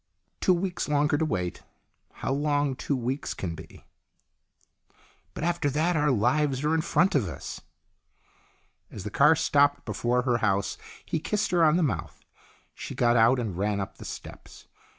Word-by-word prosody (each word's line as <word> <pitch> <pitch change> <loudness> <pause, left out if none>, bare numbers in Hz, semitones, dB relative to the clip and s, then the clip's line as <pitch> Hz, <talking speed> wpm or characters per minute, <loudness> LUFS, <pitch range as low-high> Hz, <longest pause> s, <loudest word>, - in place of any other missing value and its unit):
"Two 185 - +3
weeks 180 -2 -3
longer 150 +1 +2
to 160 - +1
wait. 90 - -3 0.5
How 135 - -3
long 145 -1 0
two 140 - -2
weeks 130 +3 -3
can 85 -3 -4
be! 80 0 -12 0.5
" - - -43
" - - -33
But - - -5
after 170 -4 0
that 160 +5 +1
our 150 -1 +2
lives 130 +4 +1
are 150 +1 +1
in 160 - +2
front 180 +3 +2
of 125 -9 +1
us." - - -7 1.3
As - - -8
the - - -5
car - - +5
stopped 145 0 +2
before 120 +3 0
her 120 -2 +1
house 100 -2 0 0.3
he 160 - -2
kissed 210 +6 -1
her 175 -2 +3
on 155 +1 +5
the 180 - +2
mouth. 80 - -3 0.5
She - - -7
got 120 0 +3
out 115 +3 +5
and 110 -7 -3
ran 100 +2 -1
up 95 - -5
the - - -9
steps. - - -10
140 Hz, 175 wpm, -27 LUFS, 115-155 Hz, 1.3 s, car